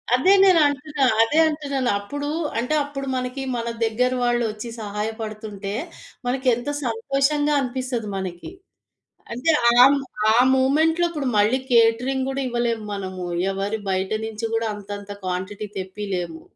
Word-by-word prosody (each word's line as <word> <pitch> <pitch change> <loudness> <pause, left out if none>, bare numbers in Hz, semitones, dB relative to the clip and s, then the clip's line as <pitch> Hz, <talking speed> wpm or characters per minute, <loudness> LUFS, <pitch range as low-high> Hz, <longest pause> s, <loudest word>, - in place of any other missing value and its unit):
అదే 320 +10 +4
నేనంటున్నా, 300 -5 +3 0.2
అదే 295 +8 +1
అంటున్నాను. 280 -4 -2
అప్పుడు 285 +8 -5 0.3
అంటే 250 +6 -1
అప్పుడు 275 -1 -6
మనకి 255 +1 -3
మన 235 -1 -3 0.2
దగ్గర 235 +3 +1
వాళ్ళు 240 0 +2
వచ్చి 215 +3 -7
సహాయపడుతుంటే, 210 -1 -5 0.5
మనకి 260 +1 -1
ఎంత 245 +4 -5 0.2
సంతోషంగా 275 +5 +1
అనిపిస్తది 250 -3 -3
మనకి. 185 - -6 0.8
అంటే 250 +7 +1 0.2
ఆ - - +4 0.6
ఆ - - +4 0.2
మూమెంట్‌లో 315 +6 +3
ఇప్పుడు 300 -5 -3
మళ్ళీ 215 +5 +3
కేటరింగ్ 245 +3 +3
గుడా 270 0 -2
ఇవ్వలేము. 235 -2 -1
మనము 185 -2 -5 0.3
ఎవరి 200 +3 -2
బయట 190 0 -1 0.2
నుంచి 220 0 -6
గూడా 225 0 0
అంతంత 205 0 -8
క్వాంటిటీ 185 +3 -4
తెప్పీలేము. 185 -4 -4
235 Hz, 125 wpm, -23 LUFS, 205-275 Hz, 0.8 s, అదే